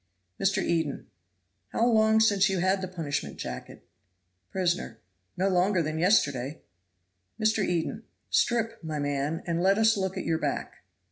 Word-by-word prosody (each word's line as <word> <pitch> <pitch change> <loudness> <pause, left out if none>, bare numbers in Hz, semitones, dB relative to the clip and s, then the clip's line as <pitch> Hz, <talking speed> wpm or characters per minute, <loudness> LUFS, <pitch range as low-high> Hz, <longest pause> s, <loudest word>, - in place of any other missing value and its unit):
Mr. 195 0 +1
Eden. 160 -4 -1 0.7
"How 230 - +2
long 220 -2 +4
since 200 -3 +4
you 190 - 0
had 190 +2 +1
the 185 - -3
punishment 165 -6 -4
jacket?" 65 0 -8 0.6
Prisoner. 175 -11 -1 0.4
"No 190 +2 +2
longer 185 -1 +2
than 155 +1 -3
yesterday." 145 - +1 0.8
Mr. 215 -1 +2
Eden. 175 -3 -2 0.3
"Strip, 230 -3 +1
my 155 -1 -4
man, 145 +2 -2
and 170 0 -1
let 195 +2 +4
us 220 -1 +4
look 190 -1 -2
at - - -4
your 160 -1 0
back." - - -3
185 Hz, 145 wpm, -28 LUFS, 160-205 Hz, 0.8 s, long